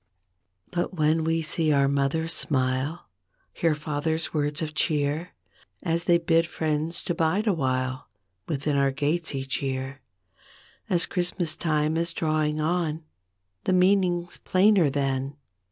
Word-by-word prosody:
But 175 +1 -2
when 155 0 +2
we 165 0 0
see 155 0 0
our 140 -1 +4
mother's 140 +4 0
smile 130 +5 0 0.5
Hear 165 -2 +1
father's 155 +2 -2
words 150 0 0
of 155 -1 -4
cheer 150 +2 -1 0.5
As 170 -1 -1
they 175 -1 +5
bid 165 -1 +2
friends 155 +1 -1
to 175 - -1
'bide 170 +5 +1
awhile 130 - -1 0.4
Within 145 -1 -1
our 140 -1 +3
gates 150 +3 -1
each 135 0 -2
year 135 0 -3 0.9
As 175 -1 +3
Christmas 175 -3 -1
time 155 -1 0
is 170 0 0
drawing 155 -2 0
on 160 0 0 0.6
The 185 - +2
meaning's 180 -2 +2
plainer 185 -4 +4
then. 135 0 -1
155 Hz, 130 wpm, -26 LUFS, 145-170 Hz, 0.9 s, they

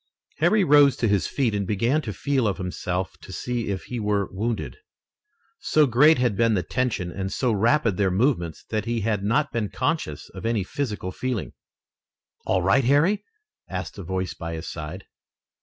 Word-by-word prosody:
Harry 195 +6 +3
rose 145 -4 +6
to 115 - +1
his 100 -6 +2
feet 125 -6 0
and 100 -2 -1
began 115 +9 +1
to 110 - -5
feel 135 +2 0
of 100 - -1
himself 90 0 -3
to - - -12
see 120 +3 -3
if 95 -2 -3
he 125 - -5
were 105 -2 0
wounded. 110 +4 -3 0.8
So 155 - +3
great 140 +5 +5
had 125 -4 +1
been 115 +1 +3
the 90 - 0
tension 120 -9 -1
and 95 +2 -4
so 125 -3 0
rapid 115 0 +2
their 100 -2 +2
movements 95 - 0
that 110 -1 -1
he 115 -1 -1
had 105 -1 0
not 140 +9 +1
been 115 -3 -1
conscious 90 - -2
of - - -10
any 115 -3 0
physical 105 -4 -3
feeling. 125 +1 -3 0.9
"All 95 -2 +2
right, 115 +10 +4
Harry?" 150 - +3 0.5
asked 90 +2 -5
a - - -5
voice 95 +1 -3
by 85 -1 -6
his 80 - -6
side. 80 +4 -6
110 Hz, 180 wpm, -24 LUFS, 95-130 Hz, 0.9 s, rose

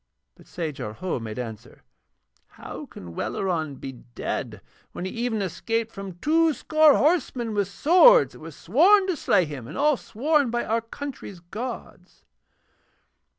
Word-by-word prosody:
But - - -20
Sajar 150 -10 -5
Ho 180 +1 -3
made 110 -2 -7
answer: 115 -4 -8 0.6
'How - - -9
can 85 -2 -11
Welleran 160 - -2
be 135 - -7
dead 120 -1 -6 0.3
when 180 - -5
he 185 - -4
even 230 -3 -2
escaped 225 +5 -2
from 195 -4 -8
two 320 - +3
score 310 +3 +4
horsemen 270 -8 +1
with 205 -2 0
swords 365 - +5
that - - -14
were - - -9
sworn 400 +1 +4
to 370 -2 -1
slay 185 - +2
him, 140 -6 -8
and 150 - -8
all 295 -1 +3
sworn 285 +6 +1
upon 240 +1 -1
our 230 +1 0
country's 230 -5 -8
gods?' 220 +9 -8
225 Hz, 150 wpm, -25 LUFS, -, 0.6 s, swords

